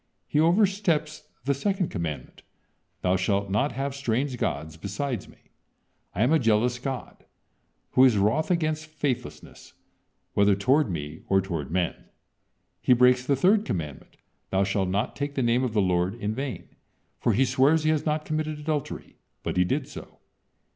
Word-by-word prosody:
He 150 - +1
oversteps 170 -4 +2 0.2
the 140 - +2
second 190 +5 -1
commandment: 80 -8 -5 0.6
"Thou 90 +1 +3
shalt 100 +1 0
not 105 +4 +1
have 135 +2 -3
strange 135 0 -1
gods 80 0 -2
besides 100 - -4
Me…, - - -18 0.8
I 105 - +2
am 130 +6 +3
a 160 - +5
jealous 120 +1 +2
God," 135 0 -6 0.7
who 130 - +5
is 125 -5 +5
wroth 110 +11 +1
against 155 -3 0
faithlessness, 140 -6 -5 0.6
whether 100 0 +4
toward 130 +7 +2
Me, 75 -2 -5
or 95 - +4
toward 85 -7 -4
men. 90 +1 -2 0.8
He 125 - +5
breaks 125 +1 +4
the 140 +2 +2
third 200 +10 +4
commandment: 80 - -5 0.3
"Thou 95 +1 +2
shalt 95 -1 0
not 100 +3 -1
take 145 0 -4
the 130 - 0
name 120 +2 +2
of 125 -4 -1
the 105 -3 +3
Lord 90 +2 +1
in 105 -2 -3
vain," 135 +1 -5 0.5
for 115 - +2
he 130 +6 +3
swears 135 +5 +3
he 155 - +3
has 155 -2 0
not 155 0 -1
committed 155 0 -2
adultery, 150 -1 -4 0.3
but - - -3
he 90 - +4
did 90 - -1
so. - - -11
125 Hz, 165 wpm, -26 LUFS, 100-150 Hz, 0.8 s, a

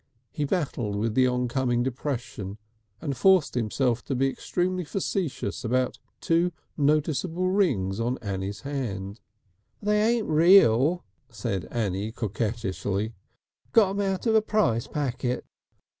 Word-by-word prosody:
He 150 - -2
battled 135 - -1
with 110 +2 -1
the 130 +2 +4
oncoming 125 0 0
depression 120 -6 -4 0.4
and 145 -4 -2
forced 185 +3 +4
himself 120 +1 0
to 135 - -2
be 135 +2 +2
extremely 180 +5 -1
facetious 180 -2 -3
about 125 +2 0 0.2
two 170 +2 +2 0.2
noticeable 155 +4 +1
rings 120 - +1
on 120 +3 0
Annie's 100 -1 -4
hand. 110 -8 -4 0.6
"They 210 0 +2
ain't 230 +1 +2
real," 160 - +5 0.2
said 100 -6 -3
Annie 105 -2 -2
coquettishly. 110 -1 -2 0.6
"Got 210 -4 +5
'em 200 - -3
out 195 +1 -1
of 225 - +3
a 220 - +5
prize 210 - +1
packet." 130 -3 -2
130 Hz, 125 wpm, -26 LUFS, 115-175 Hz, 0.6 s, real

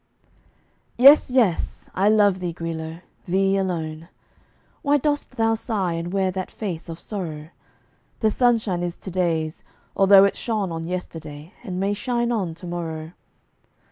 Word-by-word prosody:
Yes, 275 +4 +8
yes! 235 -10 +1
I 195 +3 +3
love 205 -3 +4
thee, 175 -2 -3
Guilo; 165 0 -5 0.3
thee 195 +2 +2
alone. 165 -4 -3 0.7
Why 290 -2 +3
dost 290 -2 -2
thou 225 0 +3
sigh, 210 -6 -1
and 165 +1 -4
wear 190 -1 +1
that 185 0 -4
face 175 -7 -6
of 165 0 -7
sorrow? 160 -7 -6 0.7
The 220 -2 +3
sunshine 225 -7 +1
is 175 0 -3
to 190 - -9
day's, 165 -3 -1 0.3
although 195 0 +7
it 200 - +2
shone 210 -6 -2
On 165 0 -4
yesterday, 165 -2 -6
and 185 -5 -4
may 200 +2 +1
shine 240 +2 -1
on 190 -8 -1
to 175 - -11
morrow. 165 -2 -5
185 Hz, 145 wpm, -23 LUFS, 165-215 Hz, 0.7 s, Yes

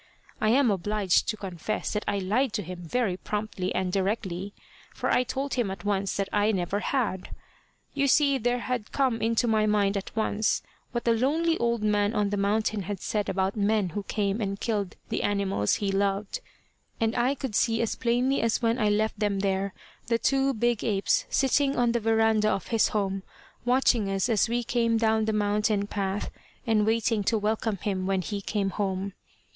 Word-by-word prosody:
I 215 - +3
am 250 0 +4
obliged 200 -1 +1
to 215 - -2
confess 190 +1 -4
that 210 - -1
I 205 - 0
lied 215 +6 0
to 210 - -1
him 180 +1 -7
very 185 +2 -1
promptly 210 -2 -3
and 185 -1 -1
directly, 195 -1 -2 0.4
for - - -1
I - - +4
told 270 +2 -3
him 240 -5 0
at 195 +1 -7
once 200 -1 0
that 195 -1 0
I 210 +1 +3
never 195 0 -1
had. 215 -7 -1 0.6
You 280 0 +1
see 280 -1 +4
there 245 +1 0
had 245 -4 -3
come 260 -5 +1
into 230 +2 +2
my 215 -1 +2
mind 205 -1 +2
at 195 - -3
once 215 -1 0 0.3
what 240 -1 -2
the 230 - +3
lonely 310 +8 +1
old 235 -2 0
man 210 +1 +1
on 205 -2 +1
the - - 0
mountain 210 +1 0
had 195 0 -4
said 210 +1 -2
about 190 +1 0
men 205 -2 +1
who 205 +5 -4
came 200 +1 -1
and 200 -1 -2
killed 205 -5 -2
the - - -1
animals 195 - +1
he 200 -2 -1
loved, 195 +1 -1 0.6
and 225 0 +1
I 250 +3 +2
could 265 -4 -5
see 225 +2 +2
as 230 - -1
plainly 250 +3 +1
as 230 -1 +1
when 230 +1 +1
I 210 -3 +3
left 215 0 0
them 205 -2 0
there, 195 0 0 0.4
the 230 0 +2
two 270 +2 +1
big 240 0 +1
apes 200 -3 +1
sitting 275 +1 +2
on 240 -1 +2
the 235 - +1
verandah 220 -1 +3
of 195 - -2
his 225 -2 +3
home, 195 -2 -1 0.4
watching 245 -4 +3
us 195 +4 0
as 225 0 +2
we 240 +1 0
came 230 -1 +1
down 220 -1 +2
the 220 - +1
mountain 210 0 +1
path, 200 0 -3 0.3
and 215 -3 +2
waiting 225 -1 +1
to 225 - +2
welcome 215 0 -1
him 190 -1 -2
when 190 -1 0
he 200 +3 -4
came 200 -1 -1
home. 195 -1 -2
210 Hz, 195 wpm, -27 LUFS, 200-230 Hz, 0.6 s, am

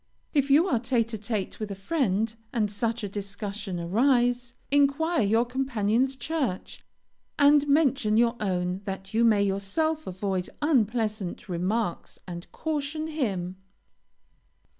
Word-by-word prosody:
If 285 -2 +2
you 305 +7 +5
are 250 -11 +2
tête 235 -1 0
à - - -7
tête 210 -2 -3
with 215 -1 -4
a 200 - -4
friend, 220 - 0 0.2
and 215 -6 0
such 225 +2 -2
a - - -1
discussion 200 -1 -5
arise, 245 +6 +2 0.2
inquire 285 +3 +3
your 225 +3 +3
companion's 250 0 0
church 265 - -3 0.5
and 290 0 +5
mention 275 -7 +3
your 235 +1 +3
own, 180 -2 -1
that 195 0 -6
you 230 +1 +3
may 215 -3 +4
yourself 200 +12 -1
avoid 185 -1 -2
unpleasant 220 - 0
remarks, 185 +2 -2
and 175 -1 -8
caution 310 0 -3
him. 195 - -2
225 Hz, 130 wpm, -27 LUFS, 200-275 Hz, 0.5 s, you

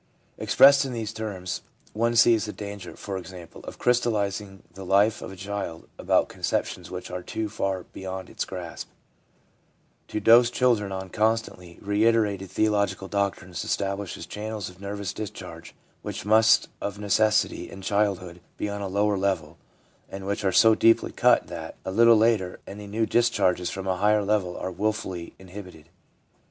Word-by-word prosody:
Expressed 140 +1 +6
in 135 -2 -4
these 110 -2 -4
terms, 100 -5 -4 0.3
one 115 +2 +1
sees 115 -1 +5
the 105 - -5
danger, 100 -1 -8
for 100 -2 -5
example, 90 -2 -11
of - - -8
crystallising 105 -5 0
the 95 +1 -9
life 100 +4 +3
of - - -7
a - - -9
child 95 -3 -5
about - - +2
conceptions - - -3
which - - -7
are 90 - -4
too 110 +4 -4
far 95 -3 -2
beyond 95 0 -7
its - - -4
grasp; - - -7 1.2
to - - -3
dose 115 +2 +6
children 120 -5 +1
on 95 0 -5
constantly 110 -5 -1
reiterated 105 -2 +1
theological 100 -2 0
doctrines 95 -4 -2
establishes 100 -4 -3
channels 105 0 -5
of 90 +1 -19
nervous 100 -1 -4
discharge 95 -6 -8 0.3
which - - -6
must 110 +2 +5
of 100 0 -4
necessity 105 +1 +1
in 95 - -10
childhood 95 -4 -1 0.2
be - - -2
on 100 0 -4
a 100 - -3
lower 100 +1 +1
level, 100 0 -2 0.5
and 95 0 -7
which 100 +1 -2
are 95 - +2
so 110 +3 +6
deeply 115 +1 +3
cut - - +4
that, - - -7
a 95 - -3
little 115 +3 +6
later, 105 -5 +2
any 100 +1 -9
new 110 +3 0
discharges 105 -7 +2
from 95 0 -5
a 95 -1 0
higher 105 +1 +3
level 100 -4 0
are 95 - -4
wilfully 95 -3 -3
inhibited. 90 -4 -11
100 Hz, 160 wpm, -26 LUFS, 95-110 Hz, 1.2 s, Expressed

